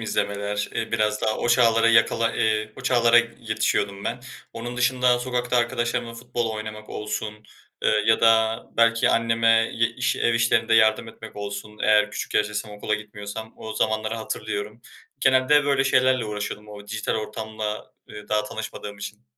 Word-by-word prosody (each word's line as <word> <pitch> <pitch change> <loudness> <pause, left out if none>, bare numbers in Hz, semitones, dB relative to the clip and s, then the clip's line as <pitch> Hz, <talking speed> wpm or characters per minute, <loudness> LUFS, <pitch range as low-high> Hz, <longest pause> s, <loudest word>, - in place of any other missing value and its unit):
izlemeler, 105 -2 -2
eee, 115 0 -3
biraz 105 -1 +1
daha 110 - +1
o 120 - -1
çağlara 115 -1 +4
yakala 115 0 +3
ııı, 110 -1 0
o - - -9
çağlara 120 -2 +5 0.2
yetişiyordum 100 -3 -1
ben. - - -3 0.3
Onun 120 +2 -6
dışında 125 0 +2
sokakta 125 0 -1
arkadaşlarımla 120 0 -1
futbol 120 -1 -3
oynamak 110 0 -7
olsun, 105 0 -4 0.5
eee, - - +3 0.2
ya 110 - +4
da 110 0 +3
belki 115 0 +4
anneme 115 0 +3
ye 115 0 +2
iş 125 +1 -1
ev 120 - +1
işlerinde 115 -1 +2
yardım 110 0 +4
etmek 110 -1 -12
olsun 105 +1 -6
eğer 105 0 +4
küçük - - -6
yaştaysam, 105 0 0
okula 105 +1 -2
gitmiyorsam, 105 +1 -8
o 110 0 -7
zamanları 110 0 0
hatırlıyorum. 110 0 -5 0.4
Genelde 130 +3 +4
böyle 140 -1 +2
şeylerle 130 -2 +3
uğraşıyordum 105 0 -5
o 105 -1 -11
dijital 110 0 -2
ortamla, 110 0 -5 0.2
eee, 105 0 -11
daha 105 0 +1
tanışmadığım 105 -1 -7
için. 100 - -8
110 Hz, 155 wpm, -24 LUFS, 105-115 Hz, 0.5 s, çağlara